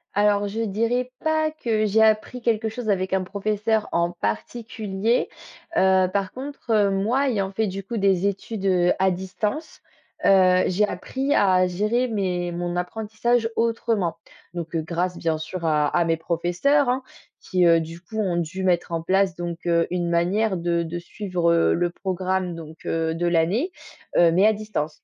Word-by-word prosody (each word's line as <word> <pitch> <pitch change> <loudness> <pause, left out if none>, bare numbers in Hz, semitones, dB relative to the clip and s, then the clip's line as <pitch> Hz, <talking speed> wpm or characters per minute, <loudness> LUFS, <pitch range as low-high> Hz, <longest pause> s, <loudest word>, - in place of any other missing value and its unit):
Alors, 205 0 +3
je 220 +3 -3
dirais 230 +4 -1
pas 315 0 +1
que 225 -8 -1
j'ai 215 +1 +3
appris 220 +3 +2
quelque 225 -1 +1
chose 225 +1 -4
avec 190 -2 0
un 190 -1 +1
professeur 210 +3 -1
en 170 0 +1
particulier, 215 - -2 0.5
heu, 190 0 +4
par 195 -1 -1
contre, 270 -2 -7
heu, 210 -2 +4
moi, 225 +8 +1
ayant 195 -5 -1
fait, 220 +2 0
du 195 +1 -5
coup, 225 +4 -5
des 195 -2 +2
études, 200 +1 -3
heu, 180 -2 +3
à 190 0 +3
distance, 205 - -4 0.4
heu, 185 -2 +5
j'ai 205 +3 +2
appris 265 +10 -2
à 185 -2 +4
gérer 215 +8 0
mes 185 -5 -1
mon 175 0 -3
apprentissage 220 +5 -1
autrement. 225 -6 0 0.4
Donc, 170 -1 -5
heu, 165 - 0
grâce, 175 +3 -2
bien 160 -1 0
sûr, 170 +3 -6
à 150 -2 +2
à 175 - +3
mes 165 0 +1
professeurs, 175 - +1
hein, 255 +1 0 0.4
qui, 180 -2 +1
heu, 165 0 +6
du 165 +1 -7
coup, 185 +5 -9
ont 185 -5 0
dû 175 +3 -3
mettre 175 -2 +1
en 165 -1 -2
place 190 0 +2
donc, 175 -1 -5
heu, 170 -1 +3
une 175 -1 -1
manière 190 +4 +1
de 170 0 0
de 170 +1 -4
suivre, 175 -1 -1
heu, 165 - +3
le 175 0 0
programme 185 -1 -2
donc, 160 -1 -11
heu, 160 0 0
de 175 +1 -1
l'année, 180 - +1 0.5
heu, 170 -1 +6
mais 185 +5 +4
à 220 - +4
distance, 210 -8 -4
190 Hz, 175 wpm, -23 LUFS, 175-220 Hz, 0.5 s, heu